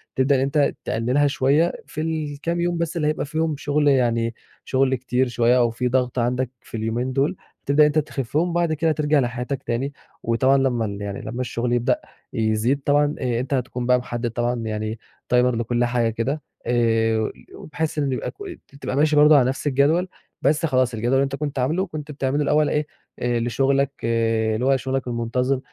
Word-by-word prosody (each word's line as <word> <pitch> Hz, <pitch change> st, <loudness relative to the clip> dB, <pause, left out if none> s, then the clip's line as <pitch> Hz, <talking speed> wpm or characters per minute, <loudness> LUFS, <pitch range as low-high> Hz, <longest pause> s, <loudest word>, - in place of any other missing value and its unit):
تبدأ 135 Hz, +2 st, +3 dB
إن 130 Hz, -, +1 dB
أنت 140 Hz, +1 st, +2 dB
تقلِّلها 125 Hz, +6 st, +1 dB
شوية 145 Hz, +4 st, +2 dB
في 155 Hz, -, -5 dB
الكام 160 Hz, +1 st, -2 dB
يوم 175 Hz, 0 st, 0 dB
بس 170 Hz, 0 st, -2 dB
اللي 150 Hz, -2 st, 0 dB
هيبقى 155 Hz, 0 st, -1 dB
فيهم 160 Hz, +1 st, -1 dB
شغل 145 Hz, +1 st, 0 dB
يعني 115 Hz, -4 st, +2 dB, 0.3 s
شغل 130 Hz, 0 st, +2 dB
كتير 130 Hz, +1 st, 0 dB
شوية 120 Hz, +1 st, +3 dB
أو 120 Hz, -1 st, +3 dB
في 125 Hz, +2 st, -2 dB
ضغط 125 Hz, 0 st, 0 dB
عندك 125 Hz, +1 st, 0 dB
في 115 Hz, -, -8 dB
اليومين 115 Hz, +4 st, -2 dB
دُول، 140 Hz, +7 st, +1 dB, 0.3 s
تبدأ 140 Hz, +2 st, +5 dB
إن -, -, +7 dB
أنت 150 Hz, +1 st, +2 dB
تخفِّهم 145 Hz, +3 st, -1 dB
وبعد 170 Hz, -1 st, +1 dB
كده 160 Hz, +1 st, +1 dB
ترجع 150 Hz, -1 st, +2 dB
لحياتك 125 Hz, +2 st, -2 dB
تاني، 130 Hz, +5 st, -2 dB, 0.3 s
وطبعًا 130 Hz, +4 st, +3 dB
لمَّا 125 Hz, -4 st, +1 dB
ال 100 Hz, -1 st, -5 dB
يعني 100 Hz, -1 st, -5 dB
لمَّا 120 Hz, +3 st, -5 dB
الشغل 120 Hz, 0 st, -2 dB
يبدأ 120 Hz, -1 st, +2 dB, 0.4 s
يزيد 110 Hz, +5 st, +1 dB
طبعًا، 145 Hz, +1 st, +3 dB
آآ، 120 Hz, -3 st, -1 dB
أنت 130 Hz, +3 st, -3 dB
هتكون 125 Hz, -1 st, -2 dB
بقى 125 Hz, 0 st, +4 dB
محدد 120 Hz, -1 st, -4 dB
طبعًا 120 Hz, +1 st, -1 dB
يعني 110 Hz, 0 st, -3 dB, 0.3 s
Timer -, -, +6 dB, 0.2 s
لكل 120 Hz, +1 st, 0 dB
حاجة 120 Hz, -1 st, +1 dB
كده 120 Hz, +7 st, -2 dB, 0.2 s
آآ، 115 Hz, -2 st, +1 dB, 0.2 s
وبحيث 155 Hz, +1 st, -4 dB
إن 140 Hz, -2 st, 0 dB
يبقى 130 Hz, -, -3 dB
ك -, -, -39 dB, 0.5 s
تبقى -, -, -3 dB
ماشي 150 Hz, +2 st, +3 dB
برضه 150 Hz, +1 st, +7 dB
على 125 Hz, -, +4 dB
نفس 135 Hz, +3 st, -3 dB
الجدول، 145 Hz, +6 st, +2 dB, 0.3 s
بس 150 Hz, +4 st, +2 dB
خلاص 130 Hz, -4 st, +1 dB
الجدول 115 Hz, +3 st, -1 dB
اللي 135 Hz, +1 st, +4 dB
أنت 135 Hz, 0 st, -2 dB
كنت 145 Hz, -1 st, -3 dB
عاملُه 160 Hz, +9 st, +1 dB
كنت 150 Hz, -2 st, -7 dB
بتعمله 140 Hz, +1 st, -1 dB
الأول 150 Hz, +1 st, +2 dB
إيه 150 Hz, 0 st, 0 dB, 0.3 s
لشغلك 125 Hz, +3 st, +1 dB
اللي 115 Hz, 0 st, +1 dB
هو 135 Hz, 0 st, +4 dB
شغلك 130 Hz, 0 st, -3 dB
المنتظم، 125 Hz, +3 st, 0 dB
130 Hz, 185 wpm, -23 LUFS, 120-145 Hz, 0.5 s, إن